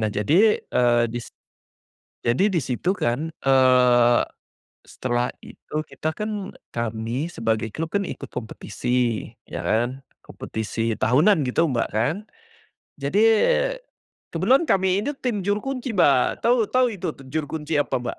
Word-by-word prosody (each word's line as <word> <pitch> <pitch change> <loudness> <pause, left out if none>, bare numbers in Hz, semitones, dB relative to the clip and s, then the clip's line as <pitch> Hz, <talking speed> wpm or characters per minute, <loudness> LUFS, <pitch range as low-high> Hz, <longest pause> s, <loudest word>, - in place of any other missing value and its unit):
Nah, 110 -1 0
jadi, 170 - +3
eee, 120 -1 +2
dis 120 +1 -6 1.0
jadi 120 +11 +2
di 170 -4 +1
situ 135 +10 -1
kan, 145 - -1
eee, 125 -2 +5 0.7
setelah 120 -1 -2
itu - - -14
kita 155 0 -4
kan, 210 0 -4 0.2
kami 115 +4 -2
sebagai 115 -6 -1
klub 160 0 -3
kan 200 - +2
ikut - - -7
kompetisi, 120 0 -2 0.2
ya - - -6
kan, 120 +5 0 0.2
kompetisi 115 +1 -3
tahunan, 145 - +3
gitu, 145 +7 +2
Mbak, 120 -3 0
kan. 120 +10 +1 0.9
Jadi 145 +10 +1 1.1
kebetulan 230 - +3
kami 190 - +2
ini 290 - -1
tim 215 -7 -2
juru 205 +2 +1
kunci 265 -2 -4
Mbak, 140 - +3
tahu 240 -1 +4
tahu 255 0 +3
itu 170 - -3 0.2
juru 155 +2 -2
kunci 150 +1 -2
apa, 145 - +1
Mbak? 120 - -5
135 Hz, 135 wpm, -23 LUFS, 120-190 Hz, 1.1 s, eee